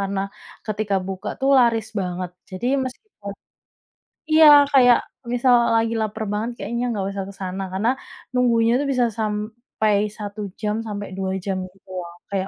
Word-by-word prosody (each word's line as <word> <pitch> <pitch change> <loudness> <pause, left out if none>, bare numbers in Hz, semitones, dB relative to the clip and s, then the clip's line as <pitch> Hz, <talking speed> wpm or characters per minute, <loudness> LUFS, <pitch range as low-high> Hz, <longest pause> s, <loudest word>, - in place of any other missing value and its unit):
karena 195 0 -1 0.5
ketika 210 -1 -1
buka, 190 -1 -5
tuh, 270 +1 +2
laris 230 -3 +3
banget. 180 -1 -3 0.2
Jadi 185 +6 -4 0.2
meskipun 255 - -8 1.0
iya, 310 0 +8 0.3
kayak 245 -3 +7 0.4
misal 245 +1 +4 0.2
lagi 225 0 +2
laper 220 +1 -3
banget 215 +3 -1
kayaknya 235 +1 -3
nggak 200 -3 -2
usah 195 -1 -4
ke - - -10
sana. 185 +1 -4
Karena 210 +5 +1 0.4
nunggunya 235 -2 +3
itu - - -1
bisa 250 -2 +2
sampai 215 0 -1 0.2
1 210 0 -6 0.2
jam 210 0 0
sampai 205 -1 -5
2 190 -1 -2
jam 195 -2 -1 0.2
gitu, 195 0 -26
loh, 170 -1 -7 0.2
kayak 195 -1 -2
215 Hz, 155 wpm, -22 LUFS, 195-235 Hz, 1.0 s, iya